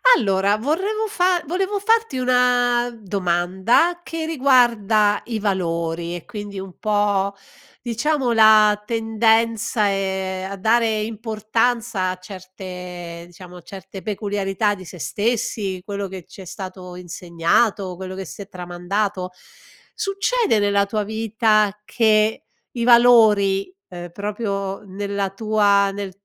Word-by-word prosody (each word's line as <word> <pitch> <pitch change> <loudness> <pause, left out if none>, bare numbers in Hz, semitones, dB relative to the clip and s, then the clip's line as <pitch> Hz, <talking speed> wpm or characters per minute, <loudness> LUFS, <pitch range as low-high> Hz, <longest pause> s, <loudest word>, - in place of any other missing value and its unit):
Allora 200 0 +1
vorrevo 385 - -1
fa 360 -3 +1
volevo 385 +5 -1
farti 450 - +1
una 245 -1 +2
domanda 190 - +1
che 330 -1 -5
riguarda 235 -8 +3
i 225 -2 -3
valori, 170 -3 -2
e 175 - -7
quindi 205 -4 -7
un 190 -1 -9
po', 205 -2 +1 0.5
diciamo, 255 +3 0
la 215 -2 +6
tendenza, 225 -1 +1
ehm, 190 -1 -2
a - - -4
dare 220 +2 +2
importanza 220 -1 -1
a 185 - -4
certe, 180 -2 -9
diciamo, 180 0 -13
certe 190 +2 -10
peculiarità 205 0 -1
di 185 -1 -11
se 180 - -10
stessi, 205 -1 -2
quello 200 -1 -4
che 190 -1 -8
ci - - -15
è - - -10
stato 185 0 -8
insegnato, 180 +3 0
quello 185 0 -7
che 190 0 -6
si 185 - -9
è - - -18
tramandato. 185 +1 -3 0.6
Succede 405 - 0
nella 200 -1 +2
tua 210 +1 -2
vita 215 -1 +1
che 215 -1 +2 0.3
i 235 - -3
valori, 225 - +5 0.2
ehm, 175 -1 -8
proprio 200 -1 -3
nella 200 0 -3
tua 200 -1 +2
nel 200 -1 -5
205 Hz, 120 wpm, -21 LUFS, 190-230 Hz, 0.6 s, la